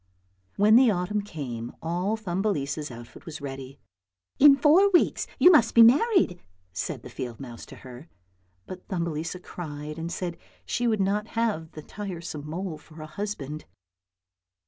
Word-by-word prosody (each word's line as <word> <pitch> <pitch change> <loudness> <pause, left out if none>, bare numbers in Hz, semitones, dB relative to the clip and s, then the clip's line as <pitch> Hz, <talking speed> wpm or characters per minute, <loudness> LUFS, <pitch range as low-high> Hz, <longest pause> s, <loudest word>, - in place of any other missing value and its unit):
When 215 +3 +6
the 255 -1 +6
autumn 200 +2 0
came 130 - -6
all 180 +6 -1
Thumbelisa's 175 -7 -2
outfit 120 +4 -12
was 160 -1 -6
ready. 135 -1 -7 0.3
" 90 -1 -51
In 285 -1 +9
four 325 +8 +5
weeks 360 -3 +2
you 360 - +7
must 245 -10 +4
be 230 - +9
married," 285 - +4 0.3
said - - -4
the - - -9
field 120 -3 -6
mouse 120 -4 -9
to - - -11
her. 130 +5 -12 0.6
But 185 0 -10
Thumbelisa 170 0 -3
cried 150 -2 -7
and 165 +1 -4
said 175 -1 -3
that - - -23 0.3
she 245 - -1
would 215 -3 +1
not 205 +3 0
have 210 -9 -1
the 155 - -9
tiresome 170 -7 -7
mole 170 -1 -4
for 155 +1 -16
a 155 - -7
husband. 155 -4 -5
175 Hz, 160 wpm, -26 LUFS, 150-210 Hz, 0.6 s, In